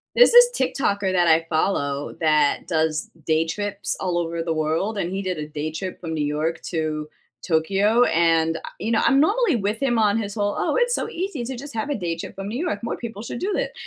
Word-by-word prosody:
There's - - +7
this 485 0 +8
TikToker 200 -7 0
that 175 -2 +3
I 165 0 +4
follow 145 -4 -1
that 150 -2 +2
does 160 -2 0
day 160 0 +2
trips 205 +3 -3
all 180 -2 -1
over 170 -1 -2
the 165 -1 -1
world, 160 +7 -1
and 175 -2 -2
he 195 +1 -2
did 185 -3 -3
a 150 0 -5
day 155 +1 -4
trip 185 +3 -6
from 165 -2 -5
New 150 -2 -1
York 155 +3 -2
to 155 -2 -2 0.4
Tokyo, 195 +8 +3
and, 165 -1 +2
a - - -5 0.2
you 225 +3 -2
know, 220 - +3
I'm 275 0 +4
normally 400 - +3
with 210 +4 -2
him 240 -4 +2
on 210 0 +3
his 205 -2 -3
whole, 205 -1 -1
"oh, - - 0
it's 485 0 +2
so - - -3
easy 340 -8 -4
to 250 +1 -5
just 280 0 -8
have 225 +6 -3
a 285 - 0
day 170 -4 -2
trip 170 - -7
from 195 +1 -6
New 230 +4 -4
York, 205 -11 -2
more 230 - -3
people 225 -3 -7
should 235 - -6
do 395 +1 -1
it," - - -2
190 Hz, 235 wpm, -23 LUFS, 160-225 Hz, 0.4 s, this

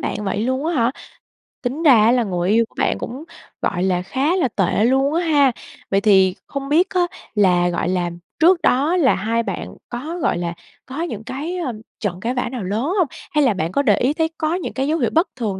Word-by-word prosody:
bạn 210 - -3
vậy 200 +2 -1
luôn 260 +5 -1
á 340 - 0
hả? 235 -2 +2 0.7
Tính 270 +6 -3
ra 290 -5 +7
á 230 - +5
là 245 -1 +3
người 180 -2 -1
yêu 230 +2 +4
của - - -29
bạn - - +1
cũng, 260 +6 -6 0.4
gọi 175 - -1
là, 185 -2 +1
khá 270 - 0
là 345 -8 +2
tệ 205 -2 0
luôn 270 +4 +2
á 340 - +1
ha! 290 -4 +4 0.4
Vậy 195 - +3
thì 190 -3 +4
hông 275 0 -5
biết 350 +6 +3
á 365 -2 +1 0.3
là, 180 -3 +3
gọi 170 -1 -2
là, 180 -1 0 0.3
trước 340 +2 +5
đó 300 +4 +2
là 280 -8 +4
hai 225 +4 -1
bạn - - -5
có, 300 +9 -5
gọi - - +1
là, 170 -1 -3 0.3
có 270 +5 -6
những 225 -11 -4
cái, 285 +8 -5
ơ, 275 -9 -3 0.3
trận 185 -4 -3
cãi 235 +5 -2
vã 250 -1 -2
nào 245 -6 -5
lớn 205 +5 -2 0.2
hông? 345 - +3 0.2
Hay 300 -1 +3
là 255 -5 +3
bạn 165 -3 -2
có 280 - +1
để 210 -8 +3
ý 265 +4 +1
thấy 320 0 0
có 315 +2 0
những 360 - -4
cái 265 +3 -1
dấu 320 +1 0
hiệu - - +1
bất 330 +4 +3
thường 210 -6 -3
250 Hz, 240 wpm, -20 LUFS, 200-300 Hz, 0.7 s, ra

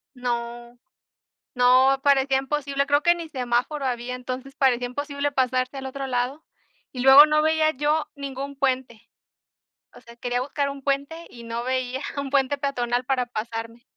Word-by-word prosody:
no, 240 -1 -4 0.8
no, 255 +2 +4
parecía 270 -1 +3
imposible, 280 0 -2
creo 290 +1 +2
que 345 - +4
ni 340 -2 -7
semáforo 255 +1 -1
había, 245 -1 -3
entonces 255 +2 -6
parecía 250 -3 +2
imposible 285 +2 -3
pasarse 255 0 0
al 265 - -6
otro 270 +1 -5
lado 255 +4 -2 0.5
y 250 - -6
luego 270 +3 +9
no 305 0 +2
veía 315 0 +3
yo 300 +3 0
ningún 280 0 -6
puente. 255 -4 -1 0.9
O - - -14
sea, 235 0 -15 0.2
buscar 280 +2 -2
un 275 0 -8
puente 280 +4 -2
y 235 - -12
no 230 +1 -4
veía 255 0 -2 0.2
un 280 -1 -3
puente 275 0 +1
peatonal 245 -3 -1
para 255 -2 0
pasarme. 230 0 -6
265 Hz, 155 wpm, -24 LUFS, 245-280 Hz, 0.9 s, luego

